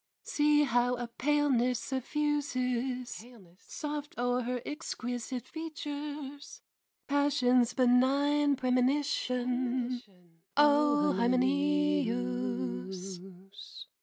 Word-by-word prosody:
See 295 0 +3
how 245 -2 +2
a 240 0 -4
paleness 255 -1 +1
suffuses 255 -2 -2 0.4
Soft 295 -1 -6
o'er 245 +1 +1
her 250 +1 -2
exquisite 245 -3 -5
features, 295 -3 -7 0.4
Passion's 255 -4 +2
benign 280 +3 +3
premonition, 255 -1 0 0.6
O 295 0 +4
Hymenæus! 95 - 0
255 Hz, 65 wpm, -30 LUFS, 240-290 Hz, 0.6 s, O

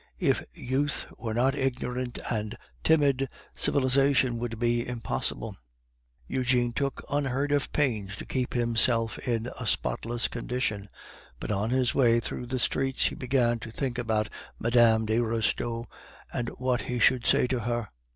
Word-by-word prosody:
If - - +2
youth 140 +3 -1
were 110 -2 -3
not 130 +3 +3
ignorant 130 -2 -2
and 110 0 -2 0.3
timid, 140 -4 +3 0.3
civilization 130 -2 +2
would 115 -1 -3
be 120 +1 +1
impossible. 115 - -2 0.7
Eugene 125 -2 +1
took 135 +3 -2
unheard 140 0 0
of 145 -1 +1
pains 110 -9 0
to - - -8
keep 130 -1 -2
himself 115 -1 +3
in 120 -1 -2
a - - -4
spotless 120 +1 -1
condition, 115 -4 -3 0.5
but - - -4
on 105 +2 0
his 125 -1 +2
way 120 -3 +4
through 120 +1 -4
the 130 +1 -2
streets 135 +2 +1
he - - -8
began 125 -2 +1
to 115 - -8
think 125 +1 -1
about 110 -2 0 0.3
Mme. 115 -1 +4
de 110 +2 +1
Restaud 115 0 -1 0.5
and 120 -1 -2
what 125 0 0
he 125 - -3
should 120 +1 +3
say - - +4
to 125 0 -1
her. 120 -1 -2
120 Hz, 150 wpm, -28 LUFS, 115-130 Hz, 0.7 s, way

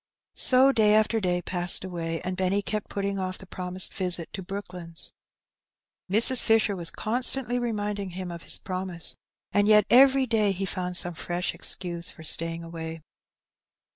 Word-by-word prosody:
So 260 +1 +5
day 215 -4 +4
after 215 +1 +3
day 180 -3 -1
passed 175 -1 +2
away, 165 -3 -4
and 185 0 -3
Benny 190 +2 0
kept 210 +1 -3
putting 200 0 -2
off 185 0 -3
the - - -10
promised 185 0 -1
visit 180 -3 -1
to 195 - -4
Brooklands. 180 -3 -6 1.0
Mrs. 230 +6 +6
Fisher 220 -2 +3
was 170 -2 -2
constantly 245 +2 -1
reminding 205 -4 -3
him 185 -2 -5
of 170 -1 -8
his - - 0
promise, 185 -2 -4 0.4
and 205 0 +2
yet 210 -1 +6
every 265 +2 +6
day 215 -4 +2
he 195 +1 -3
found 180 -1 -2
some 175 - -1
fresh 175 +2 -3
excuse 175 -2 -5
for 160 - -13
staying 165 +1 -1
away. 165 -1 -7
190 Hz, 160 wpm, -26 LUFS, 175-215 Hz, 1.0 s, Mrs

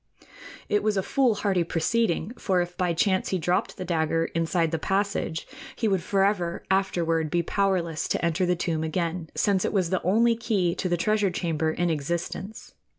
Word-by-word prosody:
It 210 - +2
was 210 -1 0
a 190 - +1
foolhardy 205 -9 +1
proceeding, 175 +2 0
for 190 -7 0
if 175 0 -2
by 180 -2 0
chance 185 +3 +1
he 190 - 0
dropped 175 +2 -1
the 185 - -5
dagger 165 -1 +1
inside 165 0 +1
the 165 - -1
passage, 195 -3 -1 0.3
he 225 - 0
would 190 -3 +1
forever 195 -2 0
afterward 165 -4 +1
be 170 +2 +1
powerless 180 -4 0
to - - 0
enter 170 +2 +1
the 180 - +2
tomb 165 -2 -1
again, 165 0 -2
since 195 -3 +2
it - - 0
was 185 -4 0
the 185 - +1
only 230 +6 +3
key 210 -7 0
to 185 - -2
the 175 - +1
treasure 210 +3 +2
chamber 165 -3 -1
in 175 +1 0
existence. 170 +7 -4
180 Hz, 180 wpm, -26 LUFS, 165-195 Hz, 0.3 s, only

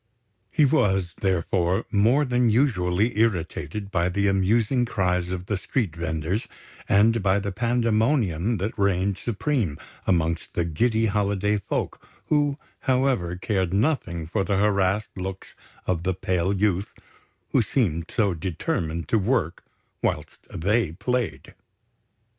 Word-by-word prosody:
He 150 - +3
was, 95 - +2
therefore, 90 -1 +1
more 115 +9 +3
than 125 -2 +2
usually 105 -4 +1
irritated 100 -2 -1
by 85 -1 +1
the 100 +2 +1
amusing 105 +6 +2
cries 90 -6 0
of 90 0 -4
the 105 +1 -1
street 100 - -2
venders 85 +5 -2 0.4
and 110 +3 +4
by 95 0 +3
the 100 0 -2
pandemonium 115 - +1
that 100 +4 -3
reigned 100 0 +1
supreme 115 - -1 0.3
amongst 85 -2 0
the 85 - +1
giddy 110 +8 +1
holiday 105 0 +1
folk, - - -3 0.3
who, 145 -2 +2 0.3
however, 125 -10 +1
cared 95 -1 -1
nothing 100 - 0
for 95 +5 -1
the 95 +1 0
harassed 100 0 +1
looks 95 0 -6 0.3
of 90 -3 0
the 95 +1 -1
pale 90 0 0
youth 100 -1 0 0.6
who - - +4
seemed 85 - 0
so 100 -5 +1
determined 80 -1 -3
to 115 - +3
work 100 -5 0 0.4
whilst - - -3
they 100 0 0
played. 100 - -2
100 Hz, 130 wpm, -25 LUFS, 90-115 Hz, 0.6 s, and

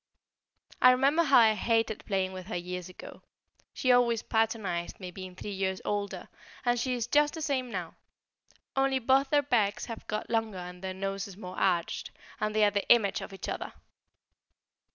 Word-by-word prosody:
I 255 - +9
remember 275 +6 +4
how 285 -5 +5
I 225 -2 +6
hated 225 0 0
playing 190 -1 0
with 185 -1 -8
her 210 - -4
years 180 0 -5
ago; 180 - -11 0.5
she 255 - +1
always 240 -2 +3
patronised 215 -6 -1
me, 185 -2 -7
being 185 0 -9
three 205 - -6
years 190 -1 -2
older, 205 -1 -3 0.4
and 240 0 +2
she 255 +1 0
is 235 -2 -2
just 295 +3 +2
the 320 - -6
same 260 -4 -1
now, 180 -6 -5 0.8
only 270 0 +2
both 265 +2 +3
their 290 0 +3
backs 215 -7 +1
have 230 -2 -8
got 215 - -3
longer 225 -3 -1
and 180 0 -8
their 190 0 -4
noses 195 0 -4
more 185 -3 -8
arched, 175 -3 0 0.3
and 215 0 -1
they 215 - +4
are 205 - +5
the 205 0 -2
image 205 -5 +4
of - - -7
each 195 - -7
other. - - -4
215 Hz, 180 wpm, -29 LUFS, 190-245 Hz, 0.8 s, I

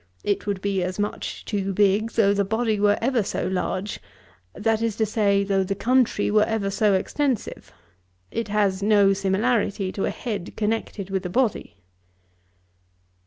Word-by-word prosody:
It 205 0 -1
would 200 -2 -2
be 200 -2 0
as 180 +1 -3
much 205 0 -4
too 195 -2 -2
big, 205 +3 +2
though 200 -3 +3
the 200 0 +1
body 220 +1 0
were 205 0 +3
ever 250 -1 +2
so 200 - -3
large; 190 +1 -2 0.6
that 225 0 0
is 230 -2 0
to 220 - +1
say, 200 -2 +2
though 195 -1 +1
the 195 +1 -2
country 245 -1 +2
were 210 0 +4
ever 215 -3 -1
so 205 0 +2
extensive. 260 +5 -2 0.6
It 230 -1 -3
has 200 -2 +1
no 200 -1 +4
similarity 195 0 0
to 195 - -2
a - - 0
head 210 -7 -5
connected 210 -3 -2
with 190 -1 -1
a - - -7
body.' 235 +3 -1
205 Hz, 165 wpm, -24 LUFS, 195-220 Hz, 0.6 s, were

